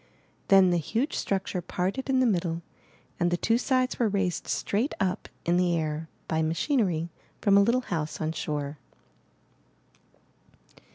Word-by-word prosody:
Then 190 -2 +6
the 175 - +2
huge 230 - -1
structure 190 -2 -1
parted 185 +10 -2
in 260 -1 +3
the - - +4
middle 170 -6 0 0.6
and 175 0 +2
the 175 - +1
two 230 +6 +2
sides 255 0 +1
were 235 -3 +3
raised 195 -3 -1
straight 225 +8 -1
up 185 -3 -1 0.2
in 175 +1 +3
the 175 -1 +2
air 155 0 -3 0.2
by 160 0 0
machinery 170 - 0 0.3
from 200 -1 +4
a 200 - +7
Httle 245 +4 +2
house 160 -8 -3
on 155 0 -1
shore. 145 -2 -3
180 Hz, 150 wpm, -27 LUFS, 165-220 Hz, 0.6 s, a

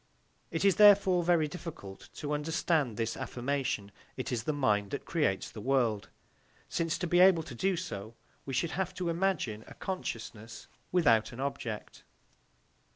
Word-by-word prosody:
It 165 +4 -1
is 195 - +4
therefore 200 -4 +6
very 165 -3 +3
difficult 155 - -9
to 150 0 -3
understand 150 -4 0
this 115 0 -1
affirmation, 125 -5 -2 0.3
"It 130 - -4
is 115 -3 -2
the - - +1
mind 105 -9 +1
that 140 - -5
creates 145 - 0
the 105 - -8
world," 120 -5 +1 0.6
since 165 -1 -1
to 180 - -2
be 175 +1 +3
able 180 -3 +6
to 140 - -9
do 185 +9 0
so, 110 - -6 0.3
we 135 - -6
should 165 +5 0
have 185 -1 -2
to 180 -2 -2
imagine 165 - -1
a - - -12
consciousness 115 - -6 0.2
without 120 -12 +3
an 120 - -9
object. 130 -6 -5
145 Hz, 160 wpm, -31 LUFS, 115-175 Hz, 0.6 s, therefore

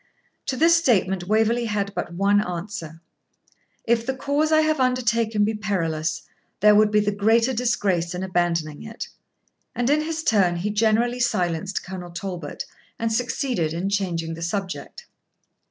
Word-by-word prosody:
To 260 - -1
this 330 +3 +5
statement 195 - +2
Waverley 225 +3 +2
had 200 -2 -2
but - - -4
one 200 +3 +3
answer: 170 -3 -6 0.8
'If 230 0 +2
the 265 +3 -2
cause 290 +4 0
I 310 0 +5
have 310 -1 +1
undertaken 230 -4 +1
be 215 +2 +1
perilous, 165 -7 -2 0.4
there 210 +2 +6
would 210 0 +5
be 210 0 +3
the 205 0 0
greater 225 +5 +2
disgrace 195 -8 0
in 180 - -3
abandoning 170 -5 -1
it.' 225 +1 -7 0.7
And 245 +3 +1
in 300 +1 +3
his 320 +1 -3
turn 190 - +3
he 190 +5 -2
generally 225 +3 +2
silenced 185 -5 -1
Colonel 180 -1 -7
Talbot, 175 -3 -6 0.3
and 230 -1 -1
succeeded 240 - -1
in 180 +4 -2
changing 170 -5 -1
the 165 - -8
subject. 180 -4 -4
205 Hz, 155 wpm, -23 LUFS, 175-235 Hz, 0.8 s, there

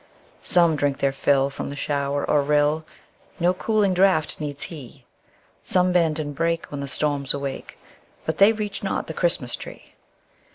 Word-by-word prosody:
Some 170 -3 +3
drink 145 -2 0
their 140 -1 +1
fill 135 0 +1
from - - -5
the 140 - -6
shower 140 0 -2
or 150 - +3
rill; 150 +2 +1 0.5
No 175 +1 +3
cooling 205 0 +1
draught 180 -4 +2
needs 145 -2 -5
he; 145 -8 -10 0.6
Some 180 0 +2
bend 165 -3 +2
and 145 -2 -4
break 165 +2 -1
when 145 - -5
the 140 - -4
storms 140 0 +1
awake, 140 -1 -6 0.5
But 160 - -3
they 200 +2 +7
reach 210 -2 -4
not 195 - -2
the 160 - -6
Christmas 165 -8 +1
tree. - - -11
150 Hz, 165 wpm, -23 LUFS, 140-175 Hz, 0.6 s, they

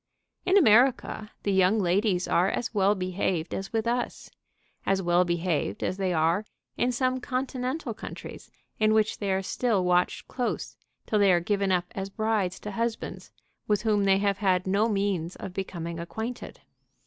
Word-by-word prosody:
In 375 +2 +5
America 240 - +4
the 200 - 0
young 190 +3 +4
ladies 185 -1 +1
are 180 +3 +3
as 235 - -3
well 200 0 +3
behaved 185 -2 -2
as 195 0 -4
with 225 0 0
us, 240 +1 -2 0.5
as 195 0 +1
well 175 -1 +3
behaved 170 - -1
as 185 - -1
they 190 -2 0
are 165 +4 +2 0.3
in 250 - +1
some 255 +1 0
Continental 255 +3 -3
countries - - -9 0.3
in 215 0 +4
which 215 -1 +1
they 200 -2 -1
are 190 0 0
still 215 -1 0
watched 180 0 +1
close 250 -2 -3 0.3
till 215 - +1
they 200 -2 +5
are 175 - +4
given 200 +2 0
up 180 -1 +2
as 195 0 -5
brides 210 -3 -1
to 210 - -5
husbands 230 +2 -3 0.4
with 210 -1 +1
whom 210 -3 +2
they 195 0 +5
have 200 0 0
had 185 -3 +2
no 200 +4 +2
means 195 -5 -1
of 185 - -7
becoming 170 -3 -5
acquainted. 220 +8 -6
195 Hz, 170 wpm, -27 LUFS, 180-220 Hz, 0.5 s, In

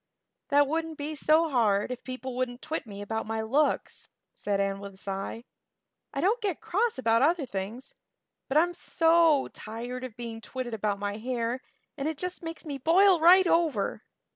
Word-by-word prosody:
"That 285 0 +4
wouldn't 320 +2 -2
be 295 +2 -4
so 310 +2 +3
hard 215 -3 +2
if 250 - -6
people 255 0 -6
wouldn't 250 -1 -3
twit 310 -6 -4
me 200 -1 -7
about 220 +1 -3
my 220 0 -2
looks," 275 +8 0 0.2
said 200 -1 -2
Anne 195 0 0
with 200 -1 -9
a - - -20
sigh. 195 +4 -5 0.7
"I - - -4
don't 440 +6 +2
get 390 -7 -1
cross 445 - 0
about 230 -2 +2
other 315 +1 +3
things; 215 +4 -6 0.5
but 275 - +1
I'm 350 +3 +3
so 330 -4 +3
tired 240 +4 -7
of 250 -3 -7
being 230 -2 -6
twitted 255 0 -5
about 210 -2 -1
my 205 0 -3
hair 240 +1 -2 0.4
and 275 - -1
it 315 -2 -2
just 360 +3 -5
makes 330 0 -7
me 285 -3 -5
boil 360 +5 +5
right 360 +4 +7
over. 325 - +1
255 Hz, 180 wpm, -28 LUFS, 225-325 Hz, 0.7 s, right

